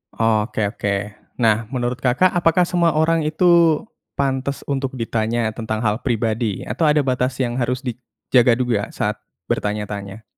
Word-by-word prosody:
Oke 110 Hz, -1 st, +1 dB
oke. 100 Hz, -1 st, -1 dB, 0.4 s
Nah, 110 Hz, -2 st, +2 dB
menurut 125 Hz, 0 st, -2 dB
Kakak 135 Hz, +9 st, +3 dB
apakah 175 Hz, +1 st, +3 dB
semua 170 Hz, -3 st, +1 dB
orang 165 Hz, +1 st, +3 dB
itu 165 Hz, 0 st, +3 dB, 0.3 s
pantas 135 Hz, 0 st, -1 dB
untuk 135 Hz, -2 st, -2 dB
ditanya 115 Hz, -1 st, -1 dB
tentang 110 Hz, -1 st, -3 dB
hal 105 Hz, +2 st, 0 dB
pribadi 115 Hz, -3 st, -1 dB
atau 120 Hz, +10 st, -2 dB
ada 150 Hz, 0 st, +4 dB
batas 125 Hz, -1 st, 0 dB
yang 120 Hz, -2 st, -1 dB
harus 125 Hz, +1 st, 0 dB
dijaga 125 Hz, 0 st, +1 dB
juga 120 Hz, -5 st, 0 dB
saat -, -, -2 dB, 0.3 s
bertanya-tanya? 105 Hz, 0 st, -3 dB
125 Hz, 140 wpm, -20 LUFS, 110-140 Hz, 0.4 s, ada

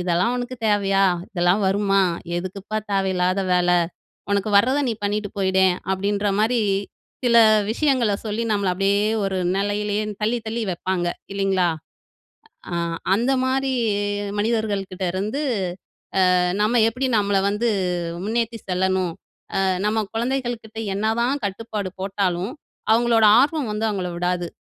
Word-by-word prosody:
இதெல்லாம் 180 Hz, +6 st, +1 dB
உனக்கு 245 Hz, +1 st, -4 dB
தேவையா? 195 Hz, -2 st, +3 dB, 0.3 s
இதெல்லாம் 180 Hz, +2 st, +2 dB
வருமா? 195 Hz, 0 st, +2 dB, 0.3 s
எதுக்குப்பா 190 Hz, +4 st, -5 dB, 0.2 s
தேவயில்லாத 190 Hz, -1 st, +1 dB
வேல. 180 Hz, 0 st, +3 dB, 0.6 s
உனக்கு 200 Hz, +1 st, +1 dB
வர்றத 255 Hz, +7 st, +2 dB
நீ -, -, +1 dB
பண்ணிட்டு 205 Hz, 0 st, -1 dB
போயிட 190 Hz, -1 st, +1 dB, 0.3 s
அப்டின்ற 200 Hz, +2 st, -1 dB
மாரி, 230 Hz, +2 st, +2 dB, 0.6 s
சில 235 Hz, -1 st, +4 dB, 0.3 s
விஷயங்கள 250 Hz, -4 st, +2 dB
சொல்லி 215 Hz, +2 st, -2 dB
நம்மள 200 Hz, -2 st, 0 dB
அப்டியே 200 Hz, +2 st, +2 dB, 0.2 s
ஒரு 195 Hz, -1 st, -1 dB, 0.2 s
நிலையிலேயே 205 Hz, +1 st, -1 dB, 0.2 s
தள்ளி, 225 Hz, +3 st, +1 dB
தள்ளி 225 Hz, +1 st, -2 dB
வைப்பாங்க 175 Hz, 0 st, -1 dB, 0.2 s
இல்லிங்களா? 195 Hz, -2 st, +1 dB, 1.0 s
ஆ -, -, -3 dB, 0.4 s
அந்த 235 Hz, +6 st, +1 dB
மாரி 265 Hz, +1 st, 0 dB, 0.7 s
மனிதர்கள் 215 Hz, -2 st, 0 dB
கிட்டருந்து 190 Hz, +7 st, -2 dB, 0.9 s
அ -, -, +4 dB, 0.2 s
நம்ம 220 Hz, +3 st, +3 dB
எப்டி 255 Hz, +4 st, -2 dB
நம்மள 200 Hz, -1 st, +2 dB
வந்து 210 Hz, +4 st, 0 dB, 0.6 s
முன்னேத்தி 230 Hz, +1 st, -1 dB
செல்லணும், 185 Hz, -1 st, 0 dB, 0.5 s
அ -, -, +2 dB, 0.2 s
நம்ம 215 Hz, +1 st, +1 dB
குழந்தைகள் 240 Hz, 0 st, -2 dB
கிட்ட 220 Hz, 0 st, -14 dB, 0.2 s
என்னதான் 235 Hz, +7 st, 0 dB
கட்டுப்பாடு 200 Hz, 0 st, -4 dB
போட்டாலும், 195 Hz, 0 st, -1 dB, 0.4 s
அவங்களோட 230 Hz, -1 st, +4 dB
ஆர்வம் 285 Hz, -2 st, +1 dB
வந்து 210 Hz, +1 st, -1 dB
அவங்கள 185 Hz, -4 st, -3 dB
விடாது. 175 Hz, 0 st, -1 dB
205 Hz, 120 wpm, -22 LUFS, 190-230 Hz, 1.0 s, சில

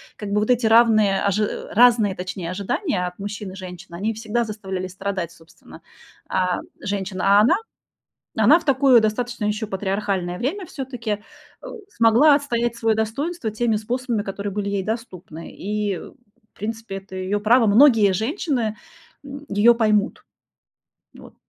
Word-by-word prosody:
Как 210 Hz, -, -7 dB
бы 210 Hz, -, +2 dB
вот 215 Hz, -, -1 dB
эти 245 Hz, -1 st, +2 dB
равные 220 Hz, -3 st, +4 dB
ожи 205 Hz, +1 st, -1 dB
разные, 230 Hz, -4 st, +4 dB
точнее, 185 Hz, -2 st, -5 dB
ожидания 195 Hz, -, -2 dB
от 180 Hz, +1 st, -7 dB
мужчин 205 Hz, -1 st, -6 dB
и -, -, -10 dB
женщин, 180 Hz, -3 st, -10 dB
они 205 Hz, +6 st, -2 dB
всегда 225 Hz, +2 st, -2 dB
заставляли 190 Hz, -4 st, -5 dB
страдать, 185 Hz, -2 st, -4 dB
собственно, 165 Hz, 0 st, -17 dB, 0.5 s
а, 180 Hz, -1 st, 0 dB, 0.2 s
женщин. 190 Hz, -1 st, -4 dB
А 200 Hz, +2 st, +5 dB
она, 235 Hz, +11 st, +5 dB, 0.8 s
а -, -, +2 dB
она 335 Hz, -, +7 dB
в -, -, -15 dB
такое 265 Hz, -3 st, +5 dB
достаточно 235 Hz, +1 st, -2 dB
ещё 210 Hz, +1 st, -2 dB
патриархальное 190 Hz, -2 st, -2 dB
время 360 Hz, -, -2 dB
всё-таки, 255 Hz, -7 st, -6 dB, 0.5 s
э, -, -, -10 dB, 0.2 s
смогла 240 Hz, -, +5 dB
отстоять 240 Hz, -5 st, -1 dB
своё 225 Hz, -1 st, +1 dB
достоинство 225 Hz, +5 st, -2 dB
теми 225 Hz, +1 st, 0 dB
способами, 235 Hz, +1 st, -2 dB
которые 200 Hz, 0 st, -5 dB
были 200 Hz, 0 st, -3 dB
ей 200 Hz, -1 st, -1 dB
доступны, 185 Hz, -7 st, -6 dB
и, 205 Hz, -1 st, -2 dB
в -, -, -12 dB, 0.5 s
принципе, 220 Hz, -1 st, -5 dB
это 195 Hz, 0 st, -11 dB
её 185 Hz, +2 st, -2 dB
право. 225 Hz, +3 st, +4 dB
Многие 220 Hz, -3 st, +6 dB
женщины, 240 Hz, -, -1 dB, 0.5 s
м, 280 Hz, +1 st, -9 dB
её 220 Hz, +4 st, +5 dB
поймут. 215 Hz, -1 st, +1 dB, 0.9 s
Вот. -, -, -14 dB
215 Hz, 150 wpm, -22 LUFS, 195-235 Hz, 0.9 s, она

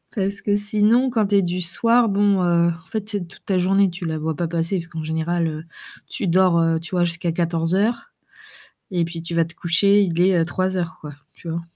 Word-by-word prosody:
parce 195 Hz, -1 st, -2 dB
que 205 Hz, -, 0 dB
sinon, 215 Hz, +5 st, +2 dB
quand 225 Hz, -4 st, 0 dB
tu 205 Hz, -, +1 dB
es -, -, +4 dB
du 180 Hz, +1 st, -2 dB
soir, 230 Hz, +7 st, +2 dB
bon, 200 Hz, -1 st, +2 dB
heu, 170 Hz, -1 st, +2 dB
en 165 Hz, -1 st, -7 dB
fait, 220 Hz, -, -3 dB
tu 210 Hz, -1 st, -1 dB
sais? 180 Hz, -, -7 dB
Toute 170 Hz, -, -16 dB
ta 190 Hz, -, 0 dB
journée, 195 Hz, +2 st, +3 dB
tu 175 Hz, 0 st, -7 dB
la 160 Hz, -1 st, -2 dB
vois 160 Hz, 0 st, -3 dB
pas 170 Hz, -, -1 dB
passer 165 Hz, +3 st, -1 dB
puisqu'en 165 Hz, -2 st, -5 dB
général, 160 Hz, +2 st, -1 dB
heu, 155 Hz, 0 st, -6 dB, 0.4 s
tu 200 Hz, -, -3 dB
dors, 180 Hz, 0 st, +3 dB
heu, 165 Hz, 0 st, +1 dB
tu 165 Hz, -1 st, -7 dB
vois, 180 Hz, -1 st, +1 dB
jusqu'à 170 Hz, 0 st, -1 dB
14:00 175 Hz, -, 0 dB, 0.8 s
et 175 Hz, -2 st, +1 dB
puis 165 Hz, 0 st, -6 dB
tu 170 Hz, +1 st, -5 dB
vas 165 Hz, -1 st, +2 dB
te 165 Hz, +1 st, -10 dB
coucher, 200 Hz, +5 st, +3 dB
il 170 Hz, -3 st, -2 dB
est 180 Hz, -2 st, +3 dB
03:00 185 Hz, -1 st, -2 dB
quoi, 150 Hz, -1 st, -9 dB, 0.2 s
tu 170 Hz, -, -10 dB
vois? 165 Hz, +1 st, -3 dB
175 Hz, 225 wpm, -21 LUFS, 165-200 Hz, 0.8 s, es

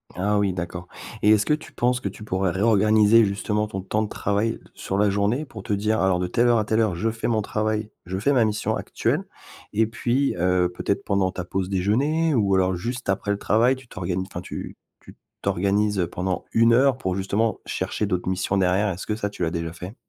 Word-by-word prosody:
Ah 100 Hz, +3 st, +1 dB
oui 100 Hz, -3 st, +1 dB
d'accord 90 Hz, 0 st, -5 dB, 0.3 s
et 105 Hz, -, +4 dB
est-ce 110 Hz, -1 st, +5 dB
que 150 Hz, -, +2 dB
tu 155 Hz, -, -5 dB
penses 125 Hz, +1 st, +1 dB
que 100 Hz, -, -3 dB
tu 105 Hz, -, -11 dB
pourrais 95 Hz, -2 st, 0 dB
réorganiser 110 Hz, +3 st, +4 dB
justement 105 Hz, +1 st, -1 dB
ton 95 Hz, -2 st, -5 dB
temps 105 Hz, +3 st, -1 dB
de 105 Hz, -, -2 dB
travail 105 Hz, +3 st, 0 dB
d -, -, -11 dB
sur 95 Hz, -, -4 dB
la 105 Hz, +1 st, +3 dB
journée 105 Hz, +9 st, 0 dB
pour 115 Hz, -6 st, -10 dB
te 100 Hz, -, -6 dB
dire: 105 Hz, +2 st, +1 dB
«Alors 95 Hz, -2 st, +3 dB
de 90 Hz, -, -1 dB
telle 120 Hz, +7 st, +2 dB
heure 120 Hz, -1 st, +4 dB
à 105 Hz, -, 0 dB
telle 110 Hz, +1 st, +1 dB
heure 105 Hz, -6 st, +2 dB
je 110 Hz, +6 st, 0 dB
fais 115 Hz, +1 st, -3 dB
mon 110 Hz, -3 st, +1 dB
travail, 110 Hz, +1 st, -2 dB, 0.2 s
je 95 Hz, +1 st, -3 dB
fais 140 Hz, +8 st, +2 dB
ma 125 Hz, -4 st, +4 dB
mission 105 Hz, -1 st, 0 dB
actuelle» -, -, -1 dB, 0.5 s
et 110 Hz, +2 st, +3 dB
puis, 120 Hz, +5 st, 0 dB
heu, 90 Hz, 0 st, +2 dB
peut-être 100 Hz, -, -1 dB
pendant 100 Hz, -2 st, +1 dB
ta 90 Hz, -, -5 dB
pause 95 Hz, 0 st, -2 dB
déjeuner 135 Hz, -, +1 dB
ou 100 Hz, -6 st, +2 dB
alors 95 Hz, 0 st, +2 dB
juste 120 Hz, +7 st, -5 dB
après 100 Hz, +1 st, -1 dB
le 100 Hz, -, +1 dB
travail 115 Hz, +6 st, +3 dB
tu 130 Hz, -2 st, -15 dB
t'organi 90 Hz, -1 st, -3 dB
enfin 95 Hz, -, -7 dB
tu -, -, -7 dB, 0.2 s
tu -, -, -15 dB
t -, -, -35 dB, 0.2 s
t'organises, 100 Hz, +2 st, +1 dB
heu, 85 Hz, -, +1 dB
pendant 90 Hz, +1 st, -2 dB
1 115 Hz, +1 st, +5 dB
heure 130 Hz, +1 st, +4 dB
pour 95 Hz, -7 st, -2 dB
justement 100 Hz, +4 st, 0 dB
chercher 105 Hz, -, -2 dB
d'autres 90 Hz, -3 st, -2 dB
missions 95 Hz, +1 st, 0 dB
derrière. 95 Hz, +3 st, +2 dB
Est-ce 90 Hz, 0 st, -5 dB
que 105 Hz, -, -1 dB
ça 105 Hz, -2 st, -2 dB
tu 95 Hz, -, -5 dB
l'as 80 Hz, -, 0 dB
déjà 85 Hz, -1 st, -3 dB
fait? 90 Hz, +6 st, -8 dB
105 Hz, 235 wpm, -24 LUFS, 95-110 Hz, 0.5 s, est-ce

